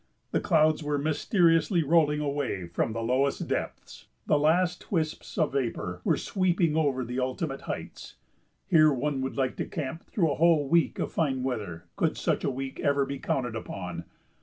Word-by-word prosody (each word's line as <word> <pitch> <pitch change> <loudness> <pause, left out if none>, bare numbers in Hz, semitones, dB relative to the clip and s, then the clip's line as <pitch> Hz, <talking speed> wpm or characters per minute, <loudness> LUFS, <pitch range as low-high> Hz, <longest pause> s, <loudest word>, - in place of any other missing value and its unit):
The - - +1
clouds 155 -2 +3
were 145 -1 -1
mysteriously 165 +3 +2
rolling 150 -1 +3
away 140 -10 -2
from 85 - -1
the 115 +1 -3
lowest 130 +4 0
depths; - - -5 0.2
the 150 - +3
last 175 +4 +1
wisps 160 -5 -2
of 155 -5 +1
vapor 115 -9 -2
were - - +2
sweeping 175 -4 +1
over 140 -5 +1
the 125 +2 -3
ultimate 135 +2 -2
heights. - - -6 0.5
Here 155 -3 +6
one 140 +1 -1
would 130 +1 -4
like 130 -2 0
to - - -2
camp 150 +4 -5
through 165 -7 +1
a - - -1
whole 160 -3 +4
week 170 +2 +2
of - - -2
fine 135 -5 0
weather 105 -10 -4
could - - +1
such - - 0
a - - +1
week 135 0 -5
ever 140 -1 +2
be 140 0 -5
counted 125 -4 -2
upon. 90 -6 -6
145 Hz, 175 wpm, -28 LUFS, 130-160 Hz, 0.5 s, Here